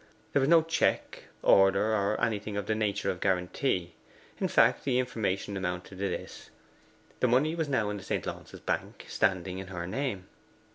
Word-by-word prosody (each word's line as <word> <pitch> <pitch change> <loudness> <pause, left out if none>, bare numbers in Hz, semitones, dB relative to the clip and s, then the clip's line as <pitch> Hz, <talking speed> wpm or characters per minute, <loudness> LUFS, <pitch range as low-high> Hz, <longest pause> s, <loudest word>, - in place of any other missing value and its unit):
There - - +4
was 135 +1 +2
no 165 -1 +6
check, 165 +1 0 0.2
order, 95 +3 +5
or 105 0 +1
anything 105 -2 -1
of 105 - -2
the 110 - 0
nature 100 -2 0
of 90 - -7
guarantee. 90 0 0 0.5
In - - +1
fact - - +4
the 130 -3 +1
information 105 -5 -1
amounted 90 -1 -3
to 100 0 0
this: - - -7 0.7
the 125 - +3
money 135 +6 +3
was 160 -3 -2
now 115 -7 +1
in 105 - -4
the 95 - -9
St. - - -2
Launce's - - -7
Bank, - - -3
standing 95 -2 0
in 95 - -7
her 90 -2 -5
name. 100 -2 -3
105 Hz, 180 wpm, -29 LUFS, 95-125 Hz, 0.7 s, no